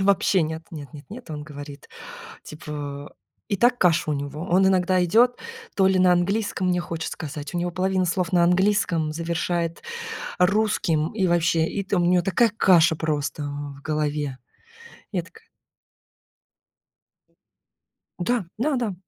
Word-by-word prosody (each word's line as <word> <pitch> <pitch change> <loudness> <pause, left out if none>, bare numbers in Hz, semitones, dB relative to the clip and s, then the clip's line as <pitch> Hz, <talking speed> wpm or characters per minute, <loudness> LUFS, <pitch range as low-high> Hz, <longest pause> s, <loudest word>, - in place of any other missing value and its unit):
вообще 195 -2 +3
нет. 160 +1 -4
Нет 145 -5 -9
нет 145 -1 -11
нет. 235 -5 -10
Он 150 -1 -5
говорит, 145 -1 -10 0.5
типа, 145 -2 -7 0.3
и 200 - 0
так 245 +4 +3
каша 170 -3 +3
у - - +2
него. 145 +1 -4
Он 190 +2 +4
иногда 185 -1 +3
идет, 235 +7 +4 0.4
то 190 -1 +4
ли 190 -1 +3
на 180 -1 +5
английском, 195 +1 0
мне 180 -1 +1
хочет 165 -1 -4
сказать, 150 0 -6
у 175 - 0
него 175 0 -1
половина 185 +1 0
слов 175 0 -1
на 175 -1 +4
английском, 180 -4 +2
завершает 170 +1 -2 0.6
русским. 180 -5 +1
И 195 -4 +1
вообще, 170 -2 +2
и 200 +4 -3
там 195 -2 +1
у - - +2
него 180 0 +3
такая 225 +5 +3
каша 170 -5 +5
просто 150 -1 -2
в 145 -1 -6
голове. 150 -3 -2 0.7
Я - - -1
такая 450 0 -18 2.7
Да, 225 +3 0
да 285 +3 +1
да. 230 -6 -1
175 Hz, 150 wpm, -24 LUFS, 155-190 Hz, 2.7 s, на